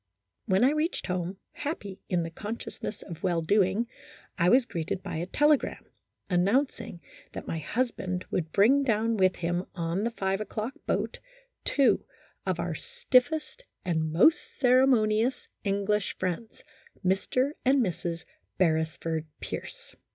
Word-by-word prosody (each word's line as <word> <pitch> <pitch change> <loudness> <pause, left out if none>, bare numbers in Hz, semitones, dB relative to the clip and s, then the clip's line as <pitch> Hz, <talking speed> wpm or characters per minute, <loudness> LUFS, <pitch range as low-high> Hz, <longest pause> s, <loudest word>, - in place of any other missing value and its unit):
When 190 +4 +3
I 265 - +6
reached 305 +3 -1
home, 180 0 -2 0.2
happy 205 - -5
in 175 -2 +1
the 165 - -5
consciousness 215 +3 -6
of 170 -3 -9
well 175 -3 +1
doing, 200 +5 +3 0.5
I 175 -1 +3
was 250 +4 +5
greeted 175 -3 -3
by - - -4
a 170 +2 -3
telegram, 295 +5 +2 0.4
announcing 195 +1 +1 0.3
that - - -6
my 165 - -3
husband 185 - -2
would 160 -3 -1
bring 240 +8 +5
down 225 -2 +1
with 185 -3 +3
him 175 +2 -2
on 170 +3 -1
the 230 - +1
five 195 -3 -1
o'clock 215 +4 -3
boat, - - -1 0.5
two 280 -2 +3 0.4
of - - 0
our - - -1
stiffest 315 - +1 0.2
and 160 -3 0
most 195 - +3
ceremoni 245 -4 +4
ous 250 +1 -2 0.2
English 200 0 0
friends, 185 +5 -4 0.4
Mr. 255 +9 +2
and 265 0 +4
Mrs. 170 -2 -3 0.3
Beresford 160 -2 0
Pierce. - - -7
200 Hz, 135 wpm, -28 LUFS, 175-250 Hz, 0.5 s, I